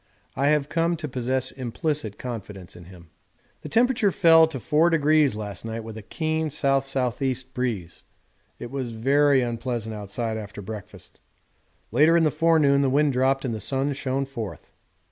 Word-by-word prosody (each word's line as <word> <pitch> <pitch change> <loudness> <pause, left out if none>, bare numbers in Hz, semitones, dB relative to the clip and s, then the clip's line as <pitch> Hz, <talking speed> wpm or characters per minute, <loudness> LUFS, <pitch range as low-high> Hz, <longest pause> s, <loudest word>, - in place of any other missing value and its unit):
I 140 - +1
have 150 -1 +2
come 165 +2 0
to 155 -2 -5
possess 130 0 -1
implicit 130 -2 -3
confidence 105 -7 -8
in 85 - -12
him. 85 -2 -15 0.5
The - - -8
temperature 240 -2 +3
fell 165 -3 +6
to 155 -4 -6
4° 155 -2 +3
last 105 -3 -5
night, 115 0 -5
with 110 -1 -8
a 110 - -7
keen 160 +7 -2
S.S.E. 135 -2 0 0.2
breeze; 115 -10 -4 0.5
it 120 - -8
was 135 -3 -3
very 140 +3 +3
unpleasant 115 -1 -3
outside 110 +2 -4
after 105 -1 -8
breakfast. 105 0 -10 0.7
Later 155 +8 +5
in 165 - +3
the 155 - +3
forenoon 155 -3 +3
the 135 - +2
wind 145 +1 +2
dropped 135 +2 +1
and 120 - -2
the 110 - -4
sun 135 +6 -1
shone 135 0 -2
forth. 115 -7 -8
130 Hz, 160 wpm, -24 LUFS, 115-150 Hz, 0.7 s, fell